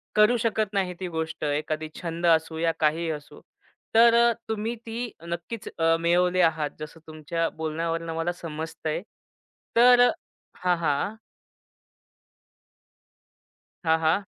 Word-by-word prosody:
करू 215 +3 +5
शकत 215 -2 0
नाही 190 -2 0
ती 185 - -3
गोष्ट, 160 0 -4
एखादी 155 +1 -2
छंद 170 0 -3
असो 160 -1 +3
या 165 +1 +2
काहीही 160 +2 +1
असो. 150 -2 -8 0.5
तर 230 +1 +7
अ, 235 0 +5 0.2
तुम्ही 220 +2 -2
ती 230 +1 -4 0.2
नक्कीच 170 +6 -5
अ, 165 0 +4
मिळवली 180 +2 +2
आहात, 160 -3 +2
जसं 155 +2 -8
तुमच्या 160 +2 -2
बोलण्यावरनं 165 +1 -3
मला 165 +2 0
समजतंय. 160 -1 -5 0.7
तर 245 +1 +7 0.5
हां, 180 -1 +1
हां. 160 +6 0 2.7
हां, 160 -1 +3
हां. 165 +5 +1
165 Hz, 120 wpm, -26 LUFS, 160-205 Hz, 2.7 s, तर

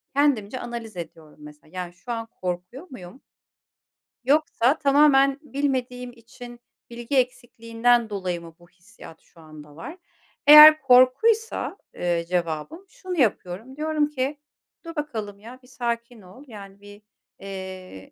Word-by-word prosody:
kendimce 255 -5 +1
analiz 235 -5 -8
ediyorum, 160 -3 -10
mesela. 150 0 -15
Yani, 180 -1 -6
"Şu 240 +7 -10
an 230 -1 -4 0.2
korkuyor 180 - -5
muyum? 235 0 -12 1.0
Yoksa 285 -1 +1
tamamen 275 -1 +4
bilmediğim 255 -4 -3
için 240 +1 -13 0.3
bilgi 240 +3 -4
eksikliğinden 240 -2 0
dolayı 185 -4 -4
mı 165 -1 -13
bu 175 0 -21
hissiyat 175 -2 -16
şu 170 - -24
anda 150 -2 -14
var?" 235 - -9 0.5
Eğer 305 +1 +10
korkuysa, 270 - +3 0.2
eee, 170 -1 -1
cevabım 175 - -3
şunu 365 0 -7
yapıyorum, 220 0 -1
diyorum 305 0 0
ki, 280 0 -3 0.5
"Dur 330 - -8
bakalım 220 -10 -5
ya, 235 +5 -12
bir - - -20
sakin 235 -2 -5
ol. 190 +8 -15
Yani, 200 -3 -12
bir, 205 0 -14 0.4
eee, 190 - -9
235 Hz, 130 wpm, -24 LUFS, 185-270 Hz, 1.0 s, Eğer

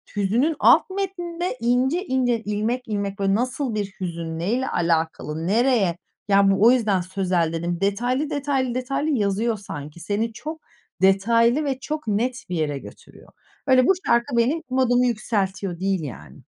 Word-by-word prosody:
Hüznün 230 +11 +1
alt - - +5
metninde 355 -5 -3
ince 255 - +1
ince, 250 -5 +1
ilmek 220 +5 -2
ilmek, 200 -1 -3
böyle 195 0 +2
nasıl 255 0 -2
bir 205 -1 0
hüzün? 165 -2 -4
Ne 185 +6 -1
ile 260 +1 0
alakalı? 160 -1 -1
Nereye? 220 -4 +2 0.3
Ya, 195 -1 +5
bu 195 - +1
o - - +8
yüzden 210 -7 +2
sözel 180 -3 -1
dedim. 170 +2 -3
Detaylı, 245 +9 0
detaylı, 275 -4 -1
detaylı 275 +4 -1
yazıyor 220 -2 0
sanki. 170 -6 -8
Seni 210 +6 -2
çok 310 +7 -7 0.4
detaylı 230 +8 +3
ve 265 -2 -2
çok 300 -3 -5
net 240 +5 -1
bir 180 - -2
yere 150 -3 -1
götürüyor. - - -14 0.4
Öyle 255 -1 +5
bu 385 - +6
şarkı 235 +1 +1
benim 275 +8 +1
modumu 250 -1 +2
yükseltiyor, 195 -6 -2
değil, 190 -2 0
yani. 130 -8 -9
225 Hz, 155 wpm, -23 LUFS, 195-255 Hz, 0.4 s, o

